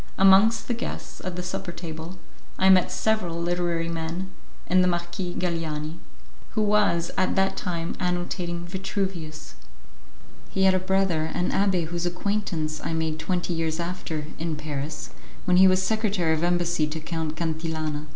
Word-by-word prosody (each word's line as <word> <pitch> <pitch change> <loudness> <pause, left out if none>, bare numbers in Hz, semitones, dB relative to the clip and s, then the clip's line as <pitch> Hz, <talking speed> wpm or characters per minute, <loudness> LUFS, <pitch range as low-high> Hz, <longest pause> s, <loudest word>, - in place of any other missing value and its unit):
Amongst 195 +4 +6
the 245 - +1
guests 235 - -5
at 185 -1 -3
the 180 - -3
supper 180 0 -4
table 170 +1 -7 0.4
I 190 - +5
met 185 -1 +5
several 185 -7 0
literary 170 -1 0
men, 170 +3 -3 0.3
and 185 0 +4
the - - +3
Marquis 175 +1 -2
Galiani, 165 -2 -2 0.6
who 215 - +3
was 205 -5 +3
at 185 - +2
that 195 0 +2
time 170 -2 -3
annotating 175 -1 -2
Vitruvius. 185 -4 -4 1.0
He 190 - +1
had 190 0 +6
a 185 - +3
brother, 185 -4 +1
an 180 0 0
abbé 190 -4 +2
whose 175 +2 -2
acquaintance 175 -4 -1
I - - -2
made 160 -1 -1
twenty 175 +1 -1
years 165 0 -1
after, 170 -3 -3
in 165 -1 -1
Paris, 150 0 -4 0.3
when 180 -1 +4
he 190 +1 +8
was 185 0 +4
secretary 200 -5 +1
of 160 +1 -1
embassy 175 -2 +2
to 155 +1 -4
Count 160 -1 -3
Cantillana. 160 -2 -2
175 Hz, 155 wpm, -26 LUFS, 160-185 Hz, 1.0 s, he